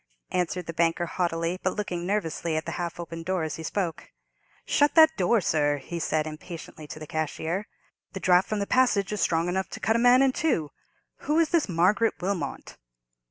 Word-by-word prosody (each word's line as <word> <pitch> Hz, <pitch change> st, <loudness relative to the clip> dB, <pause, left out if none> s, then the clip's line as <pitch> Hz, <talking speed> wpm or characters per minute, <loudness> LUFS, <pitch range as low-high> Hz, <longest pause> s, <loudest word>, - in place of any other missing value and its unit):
answered 180 Hz, 0 st, -1 dB
the 165 Hz, -, -5 dB
banker, 170 Hz, +1 st, +1 dB
haughtily, 170 Hz, 0 st, -1 dB
but 185 Hz, -, -1 dB
looking 180 Hz, -4 st, -3 dB
nervously 170 Hz, -5 st, -1 dB
at 155 Hz, -, -3 dB
the -, -, -4 dB
half 175 Hz, 0 st, -4 dB
opened 165 Hz, -1 st, -6 dB
door 185 Hz, -1 st, -1 dB
as 155 Hz, -1 st, -4 dB
he -, -, -7 dB
spoke. 170 Hz, 0 st, -3 dB, 0.6 s
"Shut 290 Hz, -1 st, +2 dB
that 320 Hz, -1 st, +7 dB
door, 200 Hz, +4 st, +2 dB
sir!" 145 Hz, -3 st, +1 dB
he 170 Hz, +5 st, -6 dB
said, 155 Hz, -1 st, 0 dB
impatiently, 155 Hz, 0 st, -9 dB
to 145 Hz, -, -8 dB
the 155 Hz, -, -8 dB
cashier; 160 Hz, +6 st, -3 dB, 0.5 s
"the 190 Hz, -, -5 dB
draught 180 Hz, 0 st, +3 dB
from 215 Hz, -, -1 dB
the 200 Hz, -, -1 dB
passage 210 Hz, -5 st, +2 dB
is 210 Hz, -, -2 dB
strong 165 Hz, 0 st, +1 dB
enough 190 Hz, +2 st, -1 dB
to -, -, -7 dB
cut 225 Hz, -, +1 dB
a -, -, +3 dB
man 245 Hz, +2 st, +6 dB
in 270 Hz, -, +4 dB
two. 215 Hz, -, 0 dB, 0.6 s
Who 300 Hz, +2 st, +2 dB
is 330 Hz, -2 st, +3 dB
this 330 Hz, -, +1 dB
Margaret 190 Hz, +6 st, +2 dB
Wilmot?" 180 Hz, -6 st, -4 dB
180 Hz, 200 wpm, -26 LUFS, 165-210 Hz, 0.6 s, that